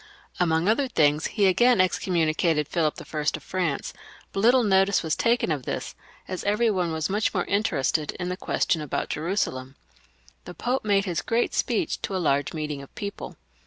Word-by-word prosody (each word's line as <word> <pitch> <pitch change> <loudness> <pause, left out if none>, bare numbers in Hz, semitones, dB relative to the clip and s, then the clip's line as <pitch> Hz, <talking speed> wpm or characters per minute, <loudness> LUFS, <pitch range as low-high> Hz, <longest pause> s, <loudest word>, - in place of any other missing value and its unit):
Among 165 0 +2
other 245 +6 +2
things 150 -8 +2
he 205 -3 +1
again 240 +6 +4
excom 185 0 +1
municated 160 -2 +1
Philip 155 -3 0
I. 155 - -8 0.2
of - - -9
France; 175 -7 -2 0.4
but - - -2
little 245 +4 +5
notice 195 -2 +3
was 160 -1 0
taken 235 -6 +1
of 140 -5 -2
this, - - -4 0.3
as 185 -1 -5
every 215 +3 +2
one 180 -4 -1
was 160 -1 -1
much 210 +2 0
more 180 - 0
interested 160 -7 0
in 180 -1 -4
the 180 - -2
question 165 -3 0
about 150 - -3
Jerusalem. 145 -6 -2 0.7
The 180 - -9
Pope 250 +2 -1
made 200 -2 +2
his 175 -4 -2
great 230 +1 0
speech 355 - -1
to 195 - -3
a - - +1
large 140 -5 +1
meeting 150 -3 -4
of 140 - -14
people. 200 -1 -6
180 Hz, 185 wpm, -25 LUFS, 155-205 Hz, 0.7 s, little